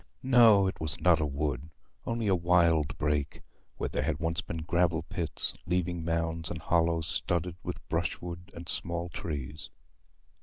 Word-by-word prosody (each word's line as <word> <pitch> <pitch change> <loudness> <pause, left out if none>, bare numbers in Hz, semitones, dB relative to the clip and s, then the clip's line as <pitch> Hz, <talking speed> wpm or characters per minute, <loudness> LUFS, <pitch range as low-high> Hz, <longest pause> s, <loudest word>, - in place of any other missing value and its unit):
No, 115 -6 +7
it 95 - -2
was 80 +1 -2
not 85 0 +5
a 75 - +1
wood, 70 0 -2 0.4
only 115 -1 -1
a 100 - +3
wild 85 -4 +3
brake, 75 -1 -1 0.3
where - - -1
there - - -1
had - - 0
once 80 0 -1
been 80 -1 -5
gravel 85 -1 +1
pits, - - -3
leaving 90 -1 0
mounds 80 0 -1
and 85 - -4
hollows 85 0 +2
studded 85 +1 -1
with - - -6
brushwood 85 +2 -3
and 85 0 -8
small 85 0 -2
trees. 75 -2 -5
85 Hz, 155 wpm, -30 LUFS, 80-90 Hz, 0.4 s, No